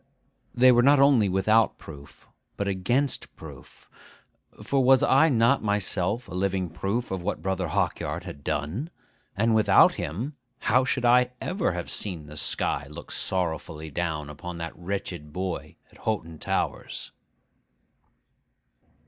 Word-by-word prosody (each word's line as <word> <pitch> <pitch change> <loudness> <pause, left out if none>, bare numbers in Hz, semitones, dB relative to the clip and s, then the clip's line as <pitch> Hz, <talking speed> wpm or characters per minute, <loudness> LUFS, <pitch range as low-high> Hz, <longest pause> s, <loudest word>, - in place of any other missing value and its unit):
They 130 +1 +7
were 120 -1 +5
not 140 +3 +5
only 135 -7 +5
without 105 +4 +3
proof, 70 -3 -13 0.3
but 100 - -2
against 120 +9 -1
proof; - - -13 0.8
for 135 -1 +1
was 130 0 +5
I 150 +5 +5
not 125 +1 +3
myself 105 +1 -1
a - - -10
living 95 -2 -1
proof 100 +8 -2
of 95 -1 -2
what 100 +4 -3
Brother 95 -2 -1
Hawkyard 75 - -1
had 70 - -9
done? 80 - -2 0.5
and 115 +2 +3
without 110 -1 +6
him, 110 - -4 0.3
how 125 +3 +3
should 130 -1 -1
I 125 +1 +5
ever 180 - -1
have 85 0 -5
seen 90 -7 -4
the 75 0 -11
sky 75 0 -1
look 85 +3 -10
sorrowfully 80 -3 -3
down 80 -2 -2
upon 85 +4 -7
that 85 0 -6
wretched 85 -4 -5
boy 90 +1 -4 0.2
at - - -19
Hoghton 85 -8 -3
Towers? - - -3
95 Hz, 140 wpm, -26 LUFS, 85-120 Hz, 0.8 s, They